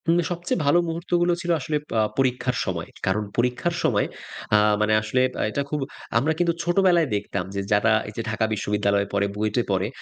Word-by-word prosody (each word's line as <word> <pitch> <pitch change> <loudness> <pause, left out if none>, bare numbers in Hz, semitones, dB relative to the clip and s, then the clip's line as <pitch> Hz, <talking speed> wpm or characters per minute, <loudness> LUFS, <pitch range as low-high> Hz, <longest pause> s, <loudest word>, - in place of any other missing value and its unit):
উম 170 - +5
সবচেয়ে 175 +1 -2
ভালো 145 +5 +5
মুহূর্তগুলো 175 +1 0
ছিল 175 0 -1
আসলে 150 +2 -3 0.2
আ - - +4 0.2
পরীক্ষার 125 -1 +1
সময়। 85 -4 -4 0.2
কারণ 100 +3 +1
পরীক্ষার 125 +8 0
সময় - - +2 0.5
আ - - +8 0.2
মানে 105 0 +2
আসলে 110 +4 0
বা - - -3
এটা 140 - -1
খুব 150 - -1 0.4
আমরা 140 +7 +2
কিন্তু 170 -1 +2
ছোটবেলায় 175 -2 +3
দেখতাম 100 -2 -2
যে 100 - -1
যারা 105 +1 +4 0.2
এইযে 110 +2 -5
ঢাকা 110 0 0
বিশ্ববিদ্যালয়ে 100 -1 0
পড়ে, 100 0 +2
বুয়েটে 110 +3 0
পড়ে 95 +1 +1
125 Hz, 180 wpm, -24 LUFS, 105-170 Hz, 0.5 s, আ